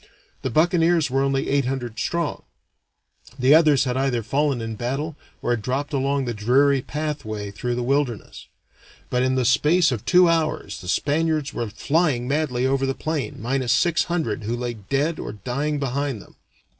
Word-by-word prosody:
The 130 - -2
buccaneers 165 +1 +2
were 135 +1 +2
only 135 0 0
eight 140 -2 +1
hundred 125 -4 -4
strong; 170 +2 -2 1.0
the 130 +2 +5
others 155 -5 +5
had 125 -2 -1
either 130 -3 0
fallen 140 +3 0
in 115 -1 -4
battle 135 +7 -3 0.3
or - - 0
had 120 -2 0
dropped 140 +6 -3
along 140 0 0
the 120 - -2
dreary 130 +6 +3
pathway 125 -10 -4
through 120 +4 -3
the 120 - -2
wilderness; 130 -4 -2 0.6
but 125 - +1
in 130 0 +1
the 130 -1 +1
space 155 +6 +4
of 115 -5 -3
two 180 -1 +5
hours 155 - -1
the 90 - -10
Spaniards 150 - 0
were 115 -2 -3
flying 135 +3 0
madly 135 -3 0
over 135 0 +1
the 135 - -1
plain, 150 -8 -3
minus 125 +1 0
six 165 +8 +2
hundred 160 -12 -2
who 110 +3 -2
lay 120 0 -3
dead 140 - -2
or - - -5
dying 130 +8 -2
behind 140 -2 -2
them. - - -16
135 Hz, 175 wpm, -23 LUFS, 120-150 Hz, 1.0 s, the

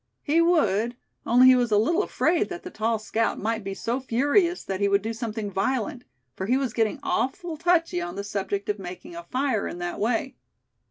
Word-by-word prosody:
He 320 +3 +3
would, 240 - +2 0.3
only 245 +2 +6
he 255 0 +8
was 245 -2 +1
a 210 - +5
little 330 - +3
afraid 340 -4 +1
that 355 -1 -7
the 360 - -8
tall 225 -2 0
scout 220 +1 -1
might 225 +1 -2
be 195 0 -4
so 235 +5 -2
furious 285 - +1
that 190 -1 -4
he 200 - +4
would 200 0 +2
do 225 +1 -2
something 220 -3 -4
violent; 250 +6 -1 0.3
for 190 - -4
he 250 +3 +3
was 265 -4 -2
getting 225 -2 0
"awful 320 +6 -1
touchy" 330 - +1
on 175 +1 -5
the 200 - -4
subject 200 0 -3
of 210 0 -1
making 190 - -8
a 340 - -8
fire 255 -5 0
in - - -6
that 175 0 -4
way. 245 +5 -1
230 Hz, 210 wpm, -25 LUFS, 205-285 Hz, 0.3 s, he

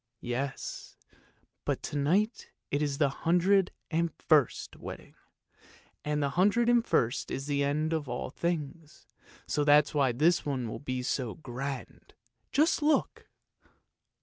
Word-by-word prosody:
" 120 - -57
" 120 - -55 0.2
Yes, 135 0 -6 0.7
but - - -2
to - - -5
night 185 - +1 0.2
it's 145 -1 0
the 145 -2 +3
hundred 180 +6 +2 0.2
and 170 +1 +1
first 150 -7 +2
wedding, - - -9 0.9
and 150 0 0
the 140 - +1
hundred 210 +9 +3
and 240 -1 +4
first 120 - 0
is 135 - -4
the 145 -1 0
end 155 +3 0
of 150 -5 -2
all 120 +1 -4
things, 160 -1 -4 0.4
so 150 - 0
that's 145 0 +5
why 140 -4 +3
this 160 +8 +3
one 130 -5 -2
will 110 - -5
be 130 -2 -3
so 125 -3 -2
grand. 135 -1 -7 0.4
Just 310 +2 +3
look! 300 +1 +1
150 Hz, 145 wpm, -30 LUFS, 135-170 Hz, 0.9 s, that's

